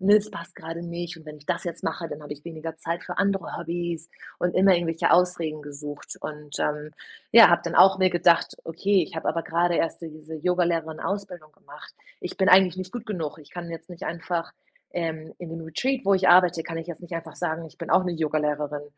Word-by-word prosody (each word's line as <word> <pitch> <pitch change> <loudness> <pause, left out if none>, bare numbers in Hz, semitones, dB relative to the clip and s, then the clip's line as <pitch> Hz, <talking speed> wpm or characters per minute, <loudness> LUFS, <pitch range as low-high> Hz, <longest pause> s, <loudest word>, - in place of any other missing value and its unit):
ne, 205 +3 +6
das 215 0 0
passt 170 +2 -9
gerade 165 -1 -6
nicht, 170 0 -5
und 160 - -15
wenn 150 -1 -9
ich 150 0 -19
das 180 - -1
jetzt 170 - -5
mache, 165 +1 -2
dann 150 - -7
habe 150 - -6
ich 145 +1 -12
weniger 165 -1 -6
Zeit 170 +2 -3
für 180 - -6
andere 200 -2 0
Hobbys“, 170 -1 -4 0.3
und 180 0 0
immer 190 0 +6
irgendwelche 165 -2 +1
Ausreden 170 -4 +2
gesucht 145 0 -8
und, 150 -1 -7
ähm, 150 0 -1 0.4
ja, 230 0 +10
habe 170 - +4
dann 170 - -2
auch 190 0 +8
mir 185 -1 +4
gedacht: 170 -1 +3
„Okay, 185 +3 +2
ich - - -13
habe 160 - -2
aber 165 +1 0
gerade 170 +1 +1
erst 165 - 0
so 165 - -6
diese 155 0 -9
Yogalehrerinnen-Ausbildung 170 0 -1
gemacht. - - -14 0.3
Ich - - -6
bin 190 -1 +3
eigentlich 185 -2 +6
nicht 185 0 -6
gut 240 -2 -6
genug. 165 -8 -4
Ich 150 - -16
kann 175 -1 -6
jetzt 165 +1 -8
nicht 175 -1 -11
einfach, 170 0 -3 0.4
ähm 160 -2 -4
in 175 - -7
dem 165 0 -6
Retreat, 250 - -1
wo 200 - +4
ich 190 0 +3
arbeite, 175 -2 +6
kann 165 - -5
ich 165 +1 -6
jetzt 170 +1 -7
nicht 175 0 -7
einfach 165 -2 -6
sagen: 165 -1 -2
„Ich 155 - -17
bin - - -6
auch 185 - +5
'ne 180 - -1
Yogalehrerin.“ 150 -1 -1
170 Hz, 225 wpm, -25 LUFS, 160-180 Hz, 0.4 s, ja